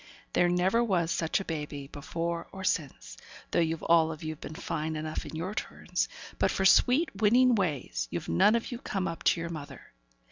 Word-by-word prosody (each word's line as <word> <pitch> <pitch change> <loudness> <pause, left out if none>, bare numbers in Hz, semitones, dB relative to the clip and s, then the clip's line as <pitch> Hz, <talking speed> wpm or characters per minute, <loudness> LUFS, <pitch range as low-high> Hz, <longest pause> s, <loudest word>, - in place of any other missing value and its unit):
There 175 - +4
never 185 +7 +2
was 175 -7 +1
such 160 -1 0
a 195 - -5
baby 150 -3 -4
before 165 +4 -4
or 190 -1 -8
since, 155 -6 -2 0.3
though - - +2
you've 165 -1 0
all 165 -1 +4
of 155 0 -8
you 155 0 -3
been 155 - -9
fine 155 +1 -3
enough 155 0 -4
in - - -8
your 180 +5 -3
turns; - - -2 0.3
but - - +3
for 190 - 0
sweet, 260 - +5
winning 245 +4 +5
ways, 140 - -1
you've - - -4
none 85 - +4
of 235 - -2
you 240 - -5
come 195 -8 -2
up 165 - -5
to - - +4
your 170 0 -4
mother. 150 -3 -9
170 Hz, 200 wpm, -29 LUFS, 155-195 Hz, 0.3 s, sweet